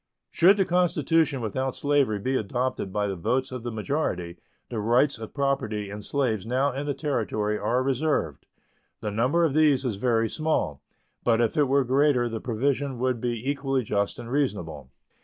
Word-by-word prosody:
Should 190 +4 +5
the 195 - +3
constitution 165 -5 +2
without 130 +4 -2
slavery 140 -7 +1
be 130 +7 -1
adopted 120 -2 -2
by 105 +1 0
the 100 -1 -2
votes 130 +10 -1
of 130 -2 -5
the 120 +1 -4
majority, 105 - -2 0.3
the 115 - -3
rights 120 +5 +2
of 110 - -9
property 110 -8 -1
in 105 +1 -6
slaves 115 -5 -1
now 130 +5 +1
in 140 +3 -4
the 145 - -1
Territory 110 -7 -1
are 125 +2 +1
reserved. 135 - -1 0.5
The 105 - -3
number 125 +11 +2
of 150 - 0
these 150 -3 +3
is 110 -6 -1
very 115 0 +1
small, 155 - -1 0.4
but 115 -1 +3
if 115 -2 +1
it 150 - +4
were 140 +1 +3
greater 130 -1 +2
the 115 -1 -5
provision 135 +3 -1
would 125 -1 -1
be 120 0 -3
equally 135 -2 0
just 100 -1 -1
and 120 0 -8
reasonable. 85 - -2
125 Hz, 175 wpm, -26 LUFS, 110-140 Hz, 0.5 s, Should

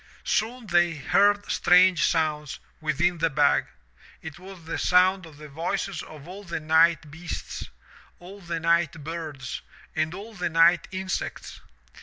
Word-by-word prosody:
Soon 235 +2 -1
they 175 -3 +2
heard 205 +7 +2
strange 180 -1 +5
sounds 150 -3 -1 0.2
within 160 +3 0
the 165 +1 +2
bag. 140 - +2 0.6
It 160 +1 -8
was 185 -1 -12
the 165 - -4
sound 185 0 +3
of 150 -3 -15
the 150 0 -11
voices 175 +6 -3
of 155 -1 -12
all 195 +3 -9
the 170 -4 -4
night 160 -1 +3
beasts, 170 - -7 0.5
all 195 +3 -12
the 170 -2 -4
night 165 -1 +1
birds, 155 -5 -6 0.3
and 155 +2 -1
all 210 +4 -9
the 180 -4 -2
night 165 +1 +4
insects. 190 0 -5
170 Hz, 145 wpm, -25 LUFS, 160-185 Hz, 0.6 s, strange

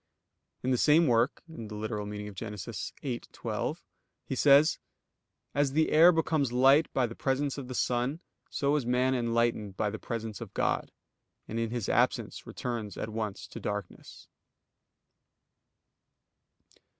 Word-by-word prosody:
In 130 - +1
the 125 - +2
same 155 +3 +5
work 120 +2 +2
(Gen. 140 -9 -8
ad 105 - -10
lit. 105 +1 -4 1.1
viii, 125 -4 -2
12) - - -4 0.4
he - - -4
says: 145 +4 +5 0.7
"As 140 -1 +1
the 155 +1 +2
air 165 +3 +8
becomes 160 -5 +1
light 135 +5 +5
by 130 - +2
the 115 - -5
presence 135 +3 -1
of 130 - -7
the 130 - -6
sun, 125 +7 0 0.3
so 140 +1 +1
is 150 - +1
man 125 +2 +2
enlightened 115 -5 0
by 105 -1 0
the 110 - -6
presence 115 -2 -5
of - - -8
God, - - 0 0.6
and 115 - -3
in 115 -1 -1
His 120 -3 -3
absence - - 0
returns 115 -5 -4
at - - -4
once 105 -3 -4
to 110 - -9
darkness." 105 -3 -6
125 Hz, 140 wpm, -30 LUFS, 115-140 Hz, 1.1 s, air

